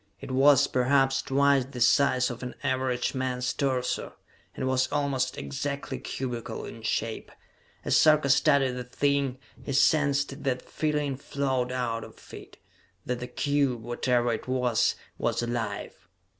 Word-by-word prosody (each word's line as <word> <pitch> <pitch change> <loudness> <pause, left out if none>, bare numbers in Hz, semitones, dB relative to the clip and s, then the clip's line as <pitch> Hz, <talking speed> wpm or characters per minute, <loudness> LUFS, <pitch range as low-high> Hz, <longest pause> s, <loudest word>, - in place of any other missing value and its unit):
It - - -8
was, 140 +1 +5
perhaps, 135 +1 +2
twice 140 0 +3
the 130 -1 -9
size 125 +1 +3
of 120 - -8
an 125 -1 -6
average 130 -2 0
man's 130 -1 -2
torso, 130 -3 -1 0.4
and 130 - -2
was 130 0 +1
almost 135 -3 -1
exactly 140 - -4
cubical 125 -3 -5
in - - -9
shape. - - -2 0.5
As - - +3
Sarka 155 -3 +5
studied 140 -2 +4
the 125 0 -5
thing, 140 +1 0 0.3
he 140 - -4
sensed 140 0 +2
that 130 -2 -1
feeling 150 -3 -1
flowed 130 -3 -2
out 120 -3 -2
of - - -14
it - - -11 0.5
that 125 -1 -2
the 125 - -5
cube, 140 -5 0
whatever 120 0 0
it 110 - -5
was, 125 -3 +1 0.2
was - - 0
alive! 115 -4 -4
130 Hz, 145 wpm, -27 LUFS, 125-140 Hz, 0.5 s, was